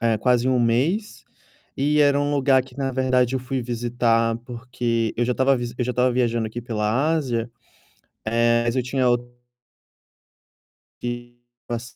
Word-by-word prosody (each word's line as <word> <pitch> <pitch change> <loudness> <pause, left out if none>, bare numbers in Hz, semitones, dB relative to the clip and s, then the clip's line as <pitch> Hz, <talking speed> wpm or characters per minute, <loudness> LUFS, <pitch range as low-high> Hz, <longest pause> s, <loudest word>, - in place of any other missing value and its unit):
eh, 115 -1 +2
quase 125 +2 +2
1 130 -1 +2
mês, 145 - 0 0.6
e 150 +2 +2
era 145 0 +4
um 145 0 0
lugar 135 -1 +4
que 130 -1 -17
na 135 -1 -1
verdade 130 -1 +1
eu - - 0
fui 130 +1 -3
visitar 115 -1 0
porque 120 -2 -2
eu 120 - +1
já 125 - 0
estava 135 +1 +3
visi 120 -1 -4
eu 125 - -1
já 125 - -1
estava 125 +1 +2
viajando 120 -2 0
aqui 110 +2 -6
pela 115 +6 0
Ásia, 125 -7 -1 0.8
eh, 115 +1 +2
mas 120 - 0
eu 130 - +1
tinha 125 0 0
o 120 - +4 1.8
que 120 0 -6 0.3
passe 120 0 -5
125 Hz, 165 wpm, -23 LUFS, 115-130 Hz, 1.8 s, era